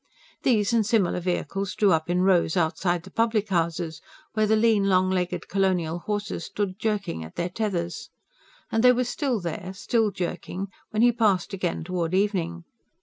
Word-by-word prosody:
These 220 -3 +2
and 230 -2 +4
similar 205 -5 +1
vehicles 185 +2 -2
drew 205 -1 +4
up 160 -1 +1
in 180 +1 +2
rows 185 -2 +3
outside 175 +1 0
the - - -13
public 225 -2 +1
houses, 170 -2 -1 0.3
where 215 -1 +2
the 220 - +4
lean, 215 -2 +3
long 185 -1 +3
legged 180 -1 -1
colonial 180 -4 0
horses 205 -3 -3
stood 200 -2 -3
jerking 205 - -2
at 80 - -11
their 175 +1 -1
tethers; 180 -4 -3 0.6
and 225 +1 +1
they 250 0 +8
were 250 +1 +1
still 250 -1 -1
there, 175 +1 -5
still 225 +2 +1
jerking, 185 +1 -4 0.2
when 215 +1 +1
he 245 - +6
passed 210 -5 +1
again 180 -4 -2
toward 175 0 -2
evening. 180 -4 0
190 Hz, 170 wpm, -25 LUFS, 175-215 Hz, 0.6 s, they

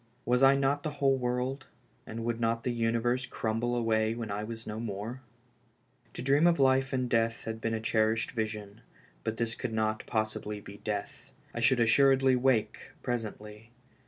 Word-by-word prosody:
Was 125 +1 +2
I 135 0 +7
not 140 +1 +1
the 155 - -2
whole 135 -1 +3
world, 125 +1 -2 0.4
and 115 +1 -5
would 120 -1 -1
not 115 0 0
the 125 - 0
universe 120 +2 0
crumble 115 +2 -1
away 110 -1 +1
when 115 -3 -5
I 105 +1 -2
w^as 115 +1 -7
no 105 +1 -5
more? 115 +3 -5 0.9
To - - -5
dream 140 +5 +4
of 170 -2 +3
life 135 0 +3
in 130 -1 0
death 115 -1 0
had 110 0 -5
been 115 0 -1
a - - -2
cherished 110 0 +1
vision, 110 -3 -4 0.4
but 110 0 -2
this 115 -1 -1
could 115 - -4
not 110 0 -1
possibly 110 -1 -2
be 100 0 -11
death. 105 -1 -5 0.2
I - - -4
should 120 +2 +4
assuredly 135 +3 +5
awake 125 -3 0
presently. 110 -2 -5
115 Hz, 175 wpm, -30 LUFS, 110-130 Hz, 0.9 s, I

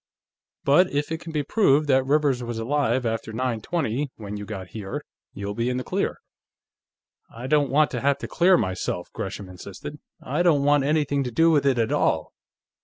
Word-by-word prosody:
"But 175 +7 +4
if 145 +2 -1
it 160 - -2
can 165 - -8
be 150 -2 -1
proved 150 -4 +3
that 130 -1 +4
Rivers 145 -3 +2
was 120 -1 -4
alive 125 +1 0
after 115 -1 -2
nine 115 -1 -2
twenty, 140 -2 -1
when 105 -2 -7
you 105 0 -6
got 95 -2 -7
here, 100 -3 -6 0.3
you'll 100 +1 -5
be 115 +3 -1
in 125 - -1
the 130 - -3
clear." - - -2 1.1
"I 115 +2 -8
don't 145 +1 +2
want 150 +3 +3
to 125 - -3
have 140 0 +2
to - - -6
clear 180 +1 +4
myself," 95 - -3
Gresham 100 0 -5
insisted. 100 +10 -9 0.2
"I 150 +6 -2
don't 160 -5 +3
want 145 -1 +4
anything 145 -2 +1
to 125 - -3
do 165 +7 +4
with 145 -3 +3
it, 135 -2 +3
at 115 -1 +1
all. - - +1
135 Hz, 195 wpm, -24 LUFS, 115-150 Hz, 1.1 s, But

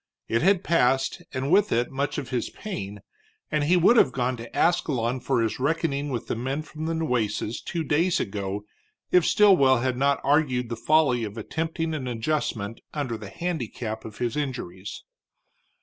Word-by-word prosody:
It 115 - +1
had 195 +1 +3
passed, 135 -5 +2
and 130 +2 -2
with 205 +2 +4
it 120 +1 +1
much 140 +2 -2
of 135 -3 -4
his 125 -2 -1
pain, 100 - -6 0.5
and 150 -1 +1
he 180 +4 +4
would 195 +8 +5
have 135 - +5
gone 125 +1 -1
to 115 0 -9
Ascalon 130 -8 +1
for 125 -2 +1
his 110 - -2
reckoning 145 0 0
with 120 -4 -3
the - - -2
men 135 +6 -2
from 155 +1 -6
the 165 - -1
Nueces 120 -7 -1
two 170 -2 -3
days 165 +4 +2
ago 100 0 -3 0.5
if 180 -2 +5
Stilwell 175 -11 +5
had 130 -1 0
not 140 +1 +2
argued 135 -4 +2
the 115 - -2
folly 135 -2 +3
of 105 0 -5
attempting 160 +7 -2
an 135 -5 -3
adjustment 115 -3 -2
under 135 -6 -2
the 105 -3 -8
handicap 120 - -4
of 110 - -9
his 120 -2 -2
injuries. 125 -10 -5
130 Hz, 175 wpm, -26 LUFS, 115-155 Hz, 0.5 s, would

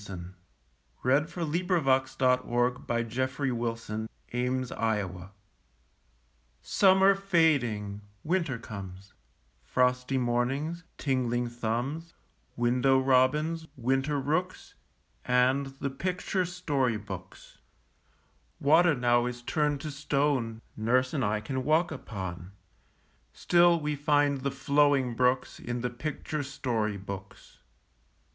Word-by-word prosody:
How 100 - -6 0.9
great 130 +2 +5
and 155 +4 -3
cool 170 0 -3
the 165 +4 -1
rooms! 130 -6 +1
PICTURE 130 +3 -1
BOOKS 115 -1 -3
IN 110 +1 -3 0.2
WINTER 115 -7 -2 1.3
Summer 190 0 +5
fading, 140 - +1 0.2
winter 165 -6 0
comes 100 -3 -9 0.5
Frosty 125 +1 +1
mornings, 130 +7 -1
tingling 125 -3 0
thumbs, 120 +8 -3 0.4
Window 125 +3 +3
robins, 135 +5 +2
winter 135 +4 0
rooks, 160 +7 -2 0.5
And 130 +2 +2
the 135 0 -5
picture 185 +5 -1
story 145 - 0
books. 105 0 -10 1.0
Water 160 +3 +5
now 120 -1 +2
is 120 0 -6
turned 150 0 0
to 155 - -5
stone 140 -5 0
Nurse 125 +4 +1
and 140 -4 0
I 105 -1 +1
can 130 +4 -3
walk 160 +4 +2
upon; 95 - -6 0.8
Still 175 -1 +4
we 150 -1 -2
find 145 -1 +2
the 140 - 0
flowing 140 -2 +2
brooks 125 +2 +1
In 120 0 -4
the 125 0 -2
picture 150 +4 -4
story 125 -7 -2
books. 100 0 -9
130 Hz, 105 wpm, -29 LUFS, 120-150 Hz, 1.3 s, great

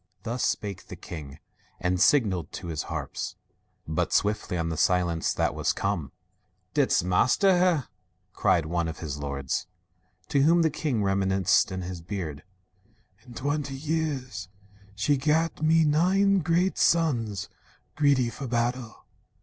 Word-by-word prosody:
' - - -41
Thus 120 +2 -2
spake 100 -3 -2
the - - -8
king, 75 -4 -9 0.4
and 90 0 0
signalled 95 - +3
to 85 - -6
his 75 -3 -2
harps; - - -4 0.5
But 80 0 -1
swiftly 105 -3 0
on 85 -1 -1
the 80 - -2
silence 85 -1 +1
that - - +1
was - - 0
come, - - -2 0.6
"Didst - - +2
master 175 - +3
her?" 175 -7 +2 0.5
cried 85 -3 +2
one 85 +1 -1
among 80 - -6
his 75 -3 -5
lords. 70 +3 -3 0.6
To 140 - +2
whom 165 +4 +5
the 160 - +2
king, 140 -8 -1
rem'niscent 95 -1 +2
in 95 0 -3
his 90 -1 -6
beard: 85 -5 -5 0.9
"In 120 - -12
twenty 145 +1 -2
years 135 -9 -3 0.5
she 140 +8 +1
gat 155 +3 +1
me 160 +1 +4
nine 190 +6 +3
great 175 +3 +1
sons, 120 - +1 0.5
Greedy 140 -5 +3
for 135 +1 -6
battle." 120 0 -2
115 Hz, 140 wpm, -27 LUFS, -, 0.9 s, whom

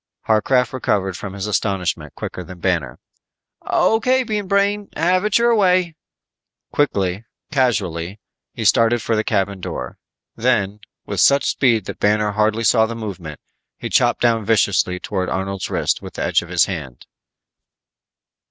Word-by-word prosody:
Harcraft 125 +4 +2
recovered 95 -7 -1
from 95 +3 -7
his 100 -1 -4
astonishment 90 -7 -2
quicker 90 - -6
than 90 +1 -11
Banner. 85 -9 -1 0.7
"O.K., 255 +4 +2
Bean 210 -4 -3
Brain, 200 +1 +1
have 180 +4 +2
it 210 - +3
your 235 0 +3
way." 185 -5 +2 0.8
Quickly, 100 -8 0 0.3
casually 100 - -1 0.3
he - - -5
started 115 +1 +4
for 115 - 0
the 110 - +1
cabin 100 -3 -1
door. 65 -7 -6 0.4
Then, 105 -4 0 0.3
with - - -4
such 140 0 +4
speed 115 -7 +2
that - - -7
Banner 105 0 +2
hardly 110 +2 +1
saw 110 -1 +4
the 115 - -5
movement, 95 -9 -7 0.4
he - - -5
chopped - - +2
down 115 -2 +2
viciously 100 -4 +2
toward 95 -1 -3
Arnold's 95 0 -3
wrist - - 0
with - - -10
the - - -3
edge - - +2
of - - -11
his - - +3
hand. 65 -2 -7
110 Hz, 150 wpm, -20 LUFS, 95-135 Hz, 0.8 s, started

